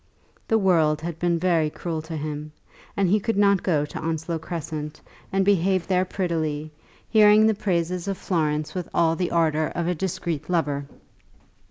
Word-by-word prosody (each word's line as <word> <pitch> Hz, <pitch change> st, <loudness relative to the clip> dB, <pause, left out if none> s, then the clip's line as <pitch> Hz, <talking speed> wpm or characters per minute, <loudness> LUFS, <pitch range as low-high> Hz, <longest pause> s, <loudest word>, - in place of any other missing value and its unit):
The 225 Hz, -, +3 dB
world 165 Hz, -7 st, +3 dB
had 165 Hz, -1 st, -5 dB
been 175 Hz, -1 st, +1 dB
very 165 Hz, -3 st, +2 dB
cruel 160 Hz, 0 st, -4 dB
to 160 Hz, 0 st, -6 dB
him, 150 Hz, 0 st, -5 dB, 0.4 s
and 195 Hz, -1 st, +3 dB
he 205 Hz, +4 st, +3 dB
could 225 Hz, +1 st, -2 dB
not 200 Hz, -2 st, +4 dB
go 150 Hz, -5 st, +1 dB
to -, -, -7 dB
Onslow 160 Hz, +1 st, -2 dB
Crescent 155 Hz, -2 st, -5 dB, 0.3 s
and 195 Hz, 0 st, +1 dB
behave 190 Hz, -2 st, +2 dB
there 185 Hz, -1 st, +1 dB
prettily, 155 Hz, -5 st, -2 dB, 0.4 s
hearing 215 Hz, -1 st, +6 dB
the 220 Hz, -, +4 dB
praises 180 Hz, -2 st, -1 dB
of 195 Hz, -1 st, -2 dB
Florence 155 Hz, -5 st, -1 dB
with 180 Hz, -2 st, -4 dB
all 165 Hz, -1 st, +3 dB
the 180 Hz, 0 st, -1 dB
ardour 160 Hz, -2 st, +2 dB
of 170 Hz, -, -1 dB
a 180 Hz, -, +1 dB
discreet 170 Hz, -3 st, -3 dB
lover. 145 Hz, -5 st, 0 dB
170 Hz, 170 wpm, -24 LUFS, 155-185 Hz, 0.4 s, hearing